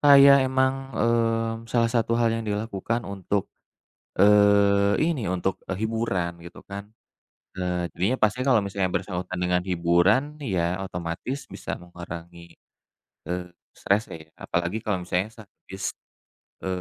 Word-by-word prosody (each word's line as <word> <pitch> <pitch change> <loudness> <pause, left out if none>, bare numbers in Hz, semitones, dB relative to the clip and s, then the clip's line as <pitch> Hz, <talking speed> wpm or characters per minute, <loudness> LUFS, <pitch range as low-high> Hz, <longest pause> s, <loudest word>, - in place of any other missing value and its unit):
kayak 140 -1 +8
emang, 130 0 +2 0.2
eee, 115 0 +1
salah 115 -1 +3
satu 115 -1 +1
hal 120 -1 +3
yang 115 - -1
dilakukan 110 +2 -2
untuk, 100 0 -2 0.8
eee, 100 0 +5 0.2
ini 130 -11 -2
untuk 95 +1 -1 0.2
hiburan 110 -6 -1
gitu 85 - -11
kan. 100 0 -5 0.7
Eee, 90 -1 -1
jadinya 110 +9 0
pastinya 115 +4 +2
kalau 110 - +4
misalnya 100 -1 -1
bersangkutan 90 -1 -3
dengan 90 0 +2
hiburan, 90 +6 +3 0.3
ya 85 +1 0
otomatis 90 +10 -4
bisa - - -5
mengurangi, 85 -1 -10 0.7
eee, 90 +1 -3 0.2
stres 100 +2 +1
ya. 80 -1 -9
Apalagi 85 +4 -2
kalau 105 -4 0
misalnya 90 +2 0
sak 110 - -12 0.2
s 95 0 -5 0.8
e - - -6
100 Hz, 130 wpm, -25 LUFS, 90-115 Hz, 0.8 s, kayak